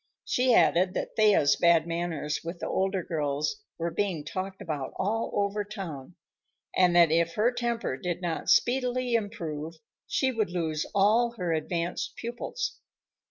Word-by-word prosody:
She 250 -1 +3
added 180 +2 +4
that - - -3
Thea's 205 -10 +5
bad 170 -2 +4
manners 165 -3 -2
with 170 +2 -5
the - - -5
older 190 -1 0
girls 145 -3 -1 0.2
were 170 0 -2
being 170 -4 -2
talked 190 +3 -5
about 150 -5 -4
all 220 +4 -1
over 205 0 0
town, 180 - -7 0.6
and 180 -1 +4
that 170 -2 +6
if 165 +1 +2
her 225 +4 +3
temper 235 - -2
did 175 +3 -3
not 175 -3 -3
speedily 250 0 +2
improve 165 -8 -3 0.3
she 265 -1 +1
would 220 -6 -1
lose 160 -4 -2
all 225 +4 +4
her 175 -4 -1
advanced 170 +2 -2
pupils. 245 - -4
180 Hz, 150 wpm, -28 LUFS, 165-215 Hz, 0.6 s, that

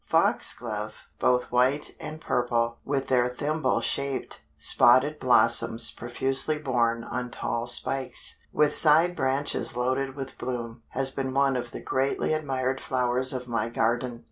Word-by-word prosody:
Foxglove, - - -1 0.2
both 125 0 +1
white 130 +4 +1
and 155 0 -7
purple, 120 -4 0
with 135 -1 -2
their 125 -2 +3
thimble 145 +2 -1
shaped 140 -1 -2 0.2
spotted 140 +5 +4
blossoms 120 -2 +3
profusely 135 +5 -1
borne 120 -5 0
on 125 +1 -4
tall 120 0 -3
spikes, 130 +2 +1
with 150 -1 +2
side 165 +3 +4
branches 135 -2 -1
loaded 130 +2 -1
with 135 -2 -7
bloom, 120 -2 -5
has 135 0 -2
been 130 -1 -4
one 135 -1 +3
of 120 -1 -3
the - - -8
greatly 135 +3 0
admired 135 -3 -2
flowers 130 0 0
of 125 -1 -4
my 115 -1 -1
garden. 120 +1 -1
130 Hz, 140 wpm, -26 LUFS, 120-135 Hz, 0.2 s, spotted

